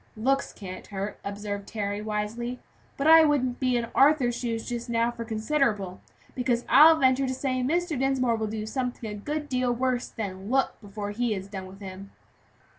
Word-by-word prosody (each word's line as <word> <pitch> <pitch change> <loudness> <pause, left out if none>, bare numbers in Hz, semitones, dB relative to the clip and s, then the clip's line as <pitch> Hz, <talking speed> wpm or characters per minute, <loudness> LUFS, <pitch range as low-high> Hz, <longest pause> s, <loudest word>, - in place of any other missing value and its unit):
"Looks 270 +5 +1
can't 185 -2 -9
hurt," 200 +1 -5
observed 205 0 -5
Harry, 205 -1 -3
wisely; 215 +3 -3 0.4
"but 275 - -2
I 320 +1 +9
wouldn't 260 -5 +1
be 255 -2 +2
in 235 -1 -2
Arthur's 270 -3 +4
shoes 230 -2 -3
just 240 0 -4
now 230 0 +1
for 235 -1 -6
considerable; 220 -4 -1 0.3
because 245 -2 0
I'll 315 +4 +8
venture 265 -2 +3
to 260 - -1
say 255 -1 -1
Mr. 320 +2 0
Dinsmore 260 -3 +2
will 220 -1 -2
do 215 0 -4
something 250 0 -3
a 210 - -5
good 295 +8 -4
deal 255 -2 0
worse 250 0 0
than 195 -2 -6
look, 265 +1 +2
before 205 0 -6
he 230 0 0
is 190 0 -6
done 190 -2 -7
with 195 +2 -13
him." 195 0 -8
235 Hz, 185 wpm, -27 LUFS, 210-260 Hz, 0.4 s, I